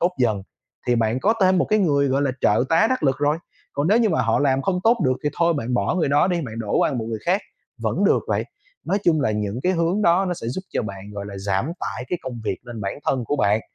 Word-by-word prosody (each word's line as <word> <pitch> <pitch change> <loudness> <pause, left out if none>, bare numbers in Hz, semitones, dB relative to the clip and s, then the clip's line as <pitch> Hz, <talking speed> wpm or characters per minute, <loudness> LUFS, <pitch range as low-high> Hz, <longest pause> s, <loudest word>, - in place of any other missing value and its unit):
tốt 180 +1 +2
dần 110 -6 +1 0.5
thì 120 - +4
bạn 115 +2 +1
có 220 +3 +3
thêm 185 -1 +4
một - - +3
cái 215 - +2
người, 140 -7 +2
gọi 135 +2 +1
là, 135 - +1
trợ 105 +4 +3
tá 165 +7 +4
đắc 260 - 0
lực 135 -3 +2
rồi. 145 +2 +1 0.3
Còn 145 +3 0
nếu 215 +4 +5
như 225 -3 +3
mà 160 - +1
họ 115 0 +2
làm 135 -2 +2
không 185 -2 0
tốt 230 +2 +5
được 130 - +3
thì - - +3
thôi 170 -1 +3
bạn 125 -3 -2
bỏ 125 - +1
người 170 -6 +1
đó 145 +4 +4
đi, 175 -2 0
bạn 125 -8 -6
đổ 105 -3 -1
qua - - +2
một 115 -4 -2
người 110 -1 -3
khác 185 +4 +3 0.4
vẫn - - 0
được - - +4
vậy. - - 0 0.4
Nói 200 - +1
chung 160 -3 +3
là 110 - +1
những 105 +2 -2
cái 185 - +2
hướng 175 +4 +1
đó 180 +1 +4
nó 180 - -1
sẽ 115 - -6
giúp 130 - -3
cho - - 0
bạn, 100 -1 -7
gọi 100 0 -6
là, 100 -1 -7
giảm 100 - -1
tải 100 +5 -4
cái 180 - -2
công 125 -3 -6
việc 100 -2 -1
lên 120 -3 -8
bản 100 +6 -4
thân 130 -3 +1
của 145 - -1
bạn 105 -1 +2
140 Hz, 285 wpm, -22 LUFS, 110-175 Hz, 0.5 s, nếu